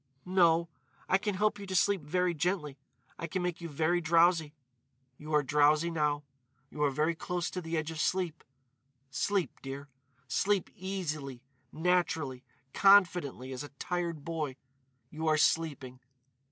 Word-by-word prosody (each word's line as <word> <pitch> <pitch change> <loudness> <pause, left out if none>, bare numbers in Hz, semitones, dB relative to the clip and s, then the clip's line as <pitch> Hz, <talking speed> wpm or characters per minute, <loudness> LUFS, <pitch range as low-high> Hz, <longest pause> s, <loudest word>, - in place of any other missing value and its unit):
"No. 170 -2 +3 0.4
I 190 - +3
can 205 -1 -2
help 210 +1 +1
you 200 - -8
to 190 - -3
sleep 195 0 +3
very 180 +4 0
gently. 155 -4 -2 0.4
I 170 - -3
can 180 +3 -2
make 180 -1 -3
you 170 - -5
very 160 +4 +1
drowsy.... 165 -2 +3 0.6
You 155 +1 -8
are 150 - +4
drowsy 150 +4 +3
now.... 150 -2 0 0.5
You 150 - -6
are 145 - +4
very 155 +5 +1
close 175 +1 -3
to 180 - -4
the 165 -1 -3
edge 155 0 -2
of 160 - -7
sleep.... 175 -1 -1 0.7
Sleep, 190 +5 -1
dear.... 140 +1 -7 0.4
Sleep, 195 +8 +1
easily, 155 -9 -4 0.3
naturally, 160 -6 0 0.3
confidently 180 -10 +4
as 130 - -5
a 145 - -8
tired 170 -4 -3
boy.... 155 -5 -3 0.6
You 160 +1 -4
are 155 0 +4
sleeping 145 -5 0
165 Hz, 150 wpm, -31 LUFS, 150-180 Hz, 0.7 s, are